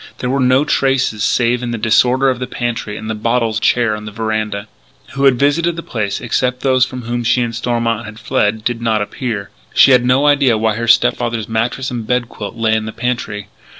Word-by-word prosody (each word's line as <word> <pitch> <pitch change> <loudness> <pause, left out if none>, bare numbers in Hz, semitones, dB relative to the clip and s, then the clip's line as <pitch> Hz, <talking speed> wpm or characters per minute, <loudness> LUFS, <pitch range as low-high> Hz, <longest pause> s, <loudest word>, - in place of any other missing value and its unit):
There 125 - -2
were 135 - 0
no 130 +2 +3
traces 135 -7 +1
save 120 +1 +1
in 120 - -3
the 120 - -3
disorder 125 +5 +3
in 125 - -5
the 125 - -4
pantry 120 -4 -4
and 110 - -7
the 110 - -2
bottles 115 0 0
and 110 - -4
chair 115 -2 +2
on 105 0 -8
the 105 - -7
veranda. 110 -1 -3 0.4
Who 140 0 -1
had 135 -3 +5
visited 160 +5 +1
the 170 - -6
place 105 -4 -3
excepting 125 +1 -1
those 130 -2 +3
from 125 -1 -7
whom 120 +1 -3
she 120 +1 +2
and 115 -1 -3
Stormont 115 -1 -1
had 110 0 -10
fled, 110 0 0
did 120 0 -2
not 110 -2 +1
appear. 105 -2 -5 0.2
She - - +7
had 125 -2 +5
no 130 +3 +3
idea 140 -5 +4
why 110 0 +1
her 120 +2 -3
step 120 - +4
father's 115 -3 -3
mattress 115 +4 -2
and 115 -3 -5
bed 125 -1 0
quilt 105 +2 -7
lay 115 -1 +1
in 110 0 0
the - - -4
pantry. 115 -4 -4
120 Hz, 225 wpm, -16 LUFS, 110-125 Hz, 0.4 s, She